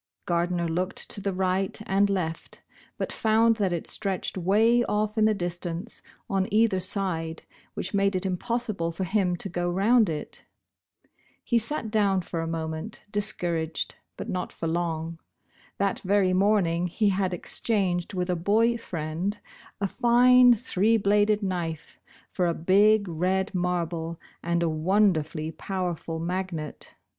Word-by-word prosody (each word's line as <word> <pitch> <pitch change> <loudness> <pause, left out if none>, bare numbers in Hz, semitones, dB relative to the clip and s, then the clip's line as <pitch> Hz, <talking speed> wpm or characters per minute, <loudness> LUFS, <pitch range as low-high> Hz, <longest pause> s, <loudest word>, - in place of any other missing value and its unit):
Gardner 175 0 0
looked 180 +3 -2
to 205 - -2
the 200 0 -1
right 190 +1 -1
and 200 +1 +2
left, 170 -5 -3 0.3
but - - -3
found 225 +1 +3
that 195 -4 +1
it 170 -2 -2
stretched 195 -3 -2
way 215 +6 +3
off 210 0 -1
in 215 -1 +3
the 215 0 +3
distance, 175 +3 -4 0.3
on 195 -3 0
either 215 -2 +3
side, 180 -4 -2 0.3
which 190 - -4
made 200 -1 +2
it 185 +1 -2
impossible 195 -2 -2
for 170 +3 -4
him 185 -1 +1
to 175 - -4
go 175 -1 -2
round 210 +4 +3
it. 150 -2 -5 1.0
He 235 - +2
sat 225 -1 -1
down 200 -3 +2
for 170 -1 -4
a 165 - -3
moment, 160 +4 -5
discouraged, 175 -6 -1 0.2
but - - -6
not 180 -1 -3
for 165 - -4
long. 165 -1 -2 0.6
That 195 -1 0
very 190 -1 +2
morning 185 -3 +2
he 205 +4 +1
had 190 -1 0
exchanged 180 0 -1
with 180 0 -1
a - - +1
boy 225 +7 +2
friend 170 +3 -3 0.4
a 200 - 0
line 245 +1 +7
three 225 -1 +1
bladed 210 +1 +2
knife 170 -5 -4 0.3
for 180 -2 0
a 170 - 0
big 200 +4 +4
red 185 +4 0
marble 170 -2 -2 0.2
and 170 0 0
a - - +2
wonderfully 160 -2 +1
powerful 175 -1 -4
magnet. 170 -2 -4
185 Hz, 145 wpm, -26 LUFS, 170-210 Hz, 1.0 s, line